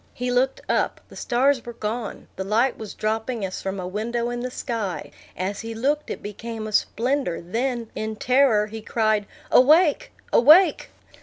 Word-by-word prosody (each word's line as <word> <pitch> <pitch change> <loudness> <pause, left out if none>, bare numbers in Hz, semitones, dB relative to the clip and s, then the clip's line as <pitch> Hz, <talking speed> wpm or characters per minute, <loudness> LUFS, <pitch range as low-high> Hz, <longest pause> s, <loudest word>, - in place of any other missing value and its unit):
He 250 0 -2
looked 255 +2 +1
up; - - 0
the - - -13
stars 260 +1 +1
were 240 - -8
gone; 220 0 -5
the 190 - -3
light 230 +6 +1
was 220 -2 -8
dropping 220 0 -2
as 185 - -5
from 195 0 -4
a 180 - -4
window 235 +5 -2
in 240 - -3
the 250 +1 -3
sky; 225 -7 -4 0.3
as 195 +2 -3
he 225 0 -6
looked, 285 +6 0
it - - -6
became 220 +2 -6
a 215 - -5
splendor; 240 -2 0
then, 230 +5 -3
in 220 0 -4
terror, 250 -2 +3
he 220 +1 -8
cried, 215 -2 0 0.2
"Awake, 305 +4 +5 0.2
awake!" 310 +7 +6
230 Hz, 170 wpm, -24 LUFS, 210-255 Hz, 0.3 s, awake